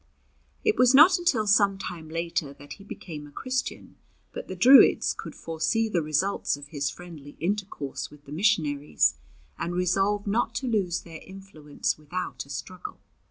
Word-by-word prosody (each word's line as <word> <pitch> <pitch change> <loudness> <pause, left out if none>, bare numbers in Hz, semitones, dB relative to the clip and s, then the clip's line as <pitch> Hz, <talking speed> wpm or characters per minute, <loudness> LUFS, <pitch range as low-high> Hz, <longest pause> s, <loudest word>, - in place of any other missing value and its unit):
It 430 -1 +2
was 250 +1 +5
not 350 +6 +7
until 285 -12 +1
some 200 -1 +4
time 165 -4 -7
later 165 -3 -3
that 145 +1 -11
he 200 - -14
became 155 -7 -9
a - - -16
Christian, 255 - -4 0.4
but - - -7
the 185 - -6
Druids 255 +9 +6
could - - -9
foresee 165 +7 -1
the 180 -6 0
results 155 +2 0
of 145 0 -11
his 140 -2 -2
friendly 155 -2 -11
intercourse 185 -6 -3
with 150 -1 -18
the 140 - -13
missionaries, 150 - +1 0.5
and 175 +1 -3
resolved 195 +3 +1
not 225 +3 0
to 255 +2 -3
lose 195 -7 0
their 165 -2 -11
influence 190 -8 -5
without 150 -4 -5
a - - -21
struggle. 140 +8 -7
180 Hz, 160 wpm, -26 LUFS, 150-210 Hz, 0.5 s, not